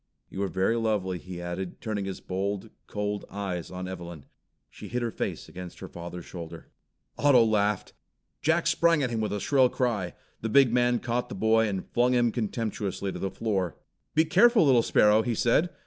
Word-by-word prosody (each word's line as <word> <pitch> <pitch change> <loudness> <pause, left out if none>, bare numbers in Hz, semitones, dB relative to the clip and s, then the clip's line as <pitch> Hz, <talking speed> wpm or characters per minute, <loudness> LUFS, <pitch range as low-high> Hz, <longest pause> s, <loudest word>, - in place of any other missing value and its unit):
You 95 - -4
are 100 - +1
very 95 +5 +1
lovely," 105 -5 0
he 90 0 -8
added, 85 +1 -5
turning 105 -3 -3
his 95 -1 -5
bold, 100 +3 -3 0.2
cold 105 0 -3
eyes 95 -4 -4
on 90 0 -6
Evelyn. 85 -5 -8 0.5
She - - -10
hid 125 0 -2
her 115 - -1
face - - -4
against 90 -1 -9
her - - -8
father's 85 0 -8
shoulder. 85 -2 -9 0.5
Otto 140 -5 +6
laughed. 105 -2 0 0.5
Jack 160 +3 +2
sprang 165 -3 +3
at 125 - -1
him 115 -1 -1
with 110 - -1
a 105 - -2
shrill 130 +2 +3
cry. 110 -10 -1 0.3
The 115 - -2
big 130 0 +5
man 120 0 +3
caught 120 +1 -2
the - - -6
boy, 110 +2 +3
and 95 -3 -3
flung 125 +1 +2
him 120 -1 +3
contemptuously 105 -4 -3
to - - -6
the 95 - -2
floor. 95 -5 -2 0.4
"Be 160 +1 +5
careful, 230 +4 +5
little 130 -4 +5
sparrow!" 105 -1 +4
he 120 0 -1
said. 125 +11 +2
105 Hz, 190 wpm, -27 LUFS, 95-120 Hz, 0.5 s, Otto